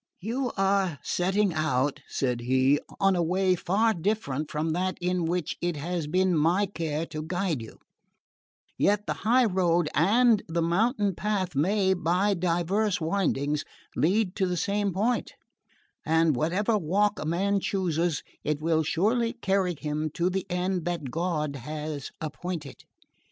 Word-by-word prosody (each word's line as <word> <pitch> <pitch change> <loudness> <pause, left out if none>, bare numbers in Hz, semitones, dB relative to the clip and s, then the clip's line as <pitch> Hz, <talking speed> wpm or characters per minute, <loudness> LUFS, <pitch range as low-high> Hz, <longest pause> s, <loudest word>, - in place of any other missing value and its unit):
"You 240 +5 -2
are 195 -4 +1
setting 190 +1 +1
out," 145 -2 0
said 125 -3 -1
he, 130 +3 +3 0.2
"on 195 -1 +3
a 175 - +1
way 185 +3 +2
far 210 +6 +1
different 165 -6 -2
from 155 +1 -1
that 185 +3 -1
in 180 -1 0
which 175 -1 -1
it 175 -1 -1
has 165 +1 -3
been 185 +3 +2
my 170 +6 +3
care 165 -5 -3
to 155 -2 -6
guide 175 -3 -2
you; 110 - -10 1.0
yet 205 +1 +2
the - - -1
high 245 +4 +4
road 175 -5 +2
and 220 +7 +4
the 165 0 0
mountain 205 +4 +1
path 190 -2 -2
may, 190 +6 +2
by 180 +4 +1
diverse 180 +3 0
windings, 155 -4 0 0.3
lead 190 +3 +1
to 190 -3 +1
the 180 0 -1
same 200 +3 0
point; 220 +7 -1 0.7
and 160 -2 +3
whatever 200 - +1
walk 200 +5 +1
a - - -4
man 195 +5 +1
chooses, 175 -5 -1 0.2
it 150 0 -1
will 160 0 +2
surely 225 +9 +1
carry 190 -5 0
him 155 +1 -2
to 175 +2 +1
the 190 0 -2
end 180 0 -1
that 170 -7 -3
God 155 -3 -1
has 150 +2 -5
appointed. 155 -1 -6
175 Hz, 150 wpm, -27 LUFS, 155-195 Hz, 1.0 s, high